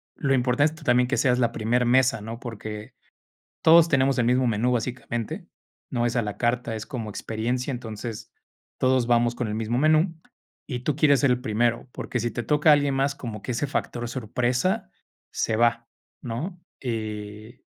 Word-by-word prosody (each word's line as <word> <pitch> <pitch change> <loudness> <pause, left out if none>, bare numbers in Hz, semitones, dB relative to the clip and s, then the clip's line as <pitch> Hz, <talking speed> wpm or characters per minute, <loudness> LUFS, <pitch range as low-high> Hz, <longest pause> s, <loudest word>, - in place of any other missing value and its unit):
lo 135 -2 0
importante 130 +4 +2
es - - -11
también 125 -2 +3
que 135 - 0
seas 125 -3 +3
la 120 -2 +2
primer 120 +2 +1
mesa, 125 -2 +3
¿no? 115 +2 -7
Porque 110 -1 -7 0.7
todos 165 +1 +7
tenemos 135 -2 +3
el 120 - +2
mismo 125 +1 +3
menú 115 +3 +1
básicamente, 120 -1 -3 0.4
no 120 -1 0
es 120 - -1
a 120 - +3
la 105 -2 -4
carta, 120 -1 0
es 110 0 -6
como 115 -5 -5
experiencia 120 +6 -2
entonces, 115 -2 -6 0.5
todos 130 -2 +3
vamos 120 0 +3
con 120 -3 -2
el 105 - -3
mismo 115 +2 -1
menú 155 +4 +3 0.5
y 125 -4 -3
tú 140 +3 -1
quieres 145 -3 +4
ser 140 - +3
el 125 - +1
primero, 115 +3 0
porque 120 - -4
sí 120 0 -1
te 120 - -3
toca 150 +4 +4
alguien 145 -2 +3
más 135 +1 +1
como 115 -6 -7
que - - -3
ese 125 +4 -1
factor 120 -3 -3
sorpresa 125 - -1 0.4
se 110 - 0
va, 115 0 +2 0.3
¿no? 150 +10 -5 0.2
Y 110 0 -5
120 Hz, 180 wpm, -25 LUFS, 115-130 Hz, 0.7 s, todos